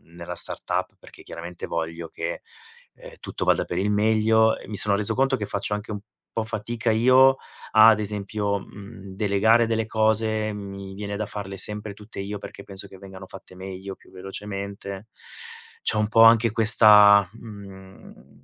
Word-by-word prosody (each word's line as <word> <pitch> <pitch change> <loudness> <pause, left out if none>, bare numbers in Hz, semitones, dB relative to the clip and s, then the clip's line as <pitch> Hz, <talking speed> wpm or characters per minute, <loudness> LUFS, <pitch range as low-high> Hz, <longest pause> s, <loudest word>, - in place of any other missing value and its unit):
nella 85 -1 -7
startup - - 0
perché - - -16
chiaramente 85 +1 -9
voglio 85 0 -5
che, - - -6 0.5
ehm, - - -13
tutto - - -6
vada - - +2
per 85 - -5
il 100 +3 0
meglio 110 +1 +2
e - - -13
mi 105 - -5
sono 100 +1 +3
reso 100 0 -1
conto 135 0 +1
che 105 - -4
faccio 100 +1 -2
anche 105 +1 -8
un 105 - -5 0.3
po' 115 - -2
fatica 115 +2 -4
io, 130 +4 +5 0.4
ad 110 -1 +6
esempio, 105 0 -2
mhmm, 100 0 -12
delegare 110 +3 +2
delle 110 -1 -1
cose. 110 0 0
Mi 100 -1 -8
viene 100 0 -6
da 105 - -3
farle 100 -2 -7
sempre 105 +1 -1
tutte 105 +1 -12
io, 100 +1 -5
perché 100 - -11
penso 100 0 -3
che 95 - -15
vengano 95 0 -12
fatte 95 -1 -12
meglio, 95 +1 -8
più - - -23
velocemente. 100 +1 -7 0.8
C'ho 110 - +2
un 105 - +1
po' 115 - +4
anche 115 0 +5
questa, 105 -3 +6
mhmm, 95 - -14
105 Hz, 165 wpm, -23 LUFS, 95-110 Hz, 0.8 s, ad